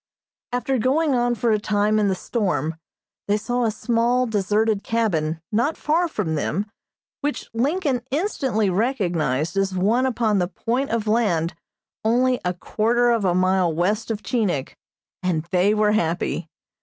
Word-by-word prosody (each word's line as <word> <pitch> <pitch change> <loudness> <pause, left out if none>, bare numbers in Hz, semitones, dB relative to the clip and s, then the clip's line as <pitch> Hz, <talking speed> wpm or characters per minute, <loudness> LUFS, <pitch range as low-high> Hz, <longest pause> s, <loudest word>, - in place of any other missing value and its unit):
After 250 +1 0
going 280 +5 +2
on 240 -1 +1
for 235 0 +1
a 215 - +2
time 210 +1 +1
in 210 - +2
the 190 - +1
storm, 170 - -1 0.5
they 205 +1 +2
saw 245 +3 -1
a - - +2
small, 235 +3 +1
deserted 210 -1 +1
cabin 165 -9 0
not 235 +9 +1
far 330 +4 +1
from 160 - -2
them 160 +6 -1 0.5
which 290 0 -3
Lincoln 275 +2 0
instantly 265 - 0
recognized 175 - 0
as 195 -1 0
one 225 +8 +2
upon 225 -5 +1
the 180 - +1
point 240 +9 -2
of 225 -2 -1
land 195 -7 +1 0.5
only 250 +3 +2
a 180 0 -1
quarter 240 +6 +1
of 230 -4 +1
a 175 -1 +2
mile 185 -1 +2
west 200 +8 0
of 215 -2 -3
Chinik, 195 - -1 0.5
and 175 -4 0
they 185 +2 +3
were 210 0 +3
happy. 175 -5 -1
215 Hz, 155 wpm, -23 LUFS, 185-245 Hz, 0.5 s, they